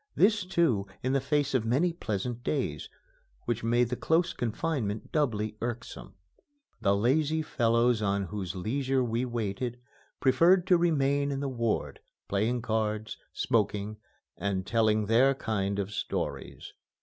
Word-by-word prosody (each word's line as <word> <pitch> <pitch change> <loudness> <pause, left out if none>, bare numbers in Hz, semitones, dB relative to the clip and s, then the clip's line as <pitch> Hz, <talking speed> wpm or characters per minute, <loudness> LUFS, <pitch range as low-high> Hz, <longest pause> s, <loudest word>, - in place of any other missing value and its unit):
This, 205 +1 +4
too, 160 - +1 0.2
in 130 +1 0
the 140 - +2
face 140 0 0
of 130 -4 +2
many 140 +10 +1
pleasant 120 - -3
days, 125 - -2 0.6
which 115 -1 -2
made 120 +1 +2
the 125 - -1
close 170 +6 +1
confinement 115 -3 -2
doubly 110 -8 0
irksome. 120 -2 -5 0.7
The 100 0 +3
lazy 150 +8 +2
fellows 115 -3 +2
on 100 -1 +1
whose 95 0 -5
leisure 130 +7 0
we 120 +1 -1
waited 120 +1 -3 0.4
preferred 170 +7 +4
to 185 -2 +5
remain 140 -4 +2
in 135 - -2
the 140 - -2
ward, 115 -4 -2 0.3
playing 110 +4 0
cards, 110 -1 -1 0.2
smoking, 105 -1 0 0.4
and 95 -2 -2
telling 110 -1 +2
their 125 +6 +4
kind 100 -5 -2
of 100 0 -2
stories. - - -4
120 Hz, 135 wpm, -29 LUFS, 105-140 Hz, 0.7 s, to